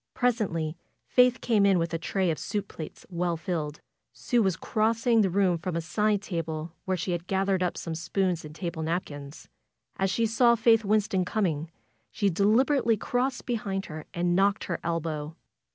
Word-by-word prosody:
Presently 200 -11 0 0.3
Faith 250 0 +4
came 220 -4 +3
in 195 -2 +5
with 165 0 -1
a 165 - -1
tray 185 +1 0
of 155 - -3
soup 205 -1 -3
plates. 160 - -8
FAITH - - -31
well 175 -1 -1
filled. 155 -3 -3 0.3
Sue 245 -2 +1
was 190 -4 +2
crossing 225 +1 +2
the 195 - +2
room 185 -2 +2
from 180 0 -3
a 170 - 0
side 205 +4 0
table, 165 -4 -4
where 185 -1 0
she 180 +2 -2
had 175 0 -3
gathered 190 -1 +1
up 180 -1 0
some 165 - -4
spoons 175 +2 -1
and 150 0 -10
table 160 0 -4
napkins. 155 -3 -4 0.5
As 195 0 +1
she 230 +4 +1
saw 235 +2 +4
Faith 225 -1 +4
Winston 205 -2 +2
coming, 170 -6 -1 0.4
she 200 -3 0
deliberately 230 - +3
crossed 250 +5 -1
behind 200 -5 -2
her 155 -1 -8
and 175 0 0
knocked 200 +2 +2
her 175 - -3
elbow. 160 -2 -3
190 Hz, 180 wpm, -27 LUFS, 165-215 Hz, 0.5 s, in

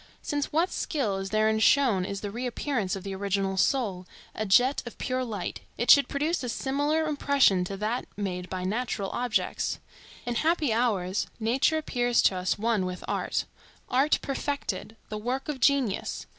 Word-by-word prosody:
Since 290 -1 -2
what 330 +5 +2
skill 230 - -1
is 195 0 -4
therein 215 +1 +2
shown 220 -6 +4
is 200 0 -4
the 205 - -4
reappearance 240 -3 -2
of 190 - -7
the 195 -1 -5
original 195 0 -1
soul, 190 -5 0 0.3
a 215 - -3
jet 250 +8 +4
of 240 - -9
pure 255 0 -1
light, 225 -4 -4 0.2
it - - +4
should 280 -3 +7
produce 300 +5 -1
a 250 - -3
similar 290 +6 0
impression 280 -10 +3
to 195 +2 -5
that 215 +5 -2
made 180 -3 -3
by 185 -1 -4
natural 205 0 -2
objects. 245 -2 -1 0.5
In 240 - -1
happy 310 +1 +1
hours, 205 -5 0
nature 250 +8 +2
appears 245 -6 +1
to 190 - +4
us 185 0 0
one 215 -3 +1
with 180 0 -6
art; - - -1 0.4
art 270 +4 +3
perfected,—the 225 -6 -4
work 255 +5 -3
of 295 -3 -3
genius. 260 -5 +1
230 Hz, 165 wpm, -27 LUFS, 195-275 Hz, 0.5 s, should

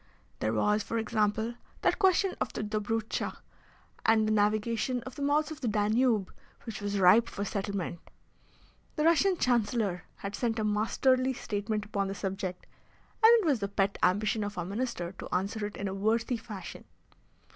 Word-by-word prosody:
There 110 - 0
was, 210 - +2
for 230 - -3
example, 220 +1 0 0.3
that - - +2
question 380 0 +3
of - - -1
the - - -3
Dobrutscha 215 +1 -2 0.7
and 220 -1 +4
the - - +1
navigation 215 +4 +1
of 260 - -8
the 285 - -8
mouths 295 +2 +1
of 310 - -8
the 250 - -1
Danube 215 0 +2 0.3
which 220 -3 -6
was 205 0 -2
ripe 200 +5 +6
for 200 - -4
settlement. 200 -4 -3 1.0
The 300 - 0
Russian 340 +3 +4
Chancellor 220 - +1
had 200 0 -6
sent 235 -2 -1
a 220 - 0
masterly 255 +5 +2
statement 210 -2 -3
upon 200 -2 -1
the 195 - -4
subject, 190 -2 -4 0.6
and 445 - +10
it - - -4
was 285 -7 +2
the 200 - -1
pet 200 0 0
ambition 210 +4 +2
of 205 0 -5
our 175 - -2
Minister 200 -3 -3
to - - -7
answer 205 +3 -1
it 205 - -10
in 200 - -3
a 190 - -3
worthy 225 +4 0
fashion. 215 -4 -9
215 Hz, 170 wpm, -30 LUFS, 200-235 Hz, 1.0 s, and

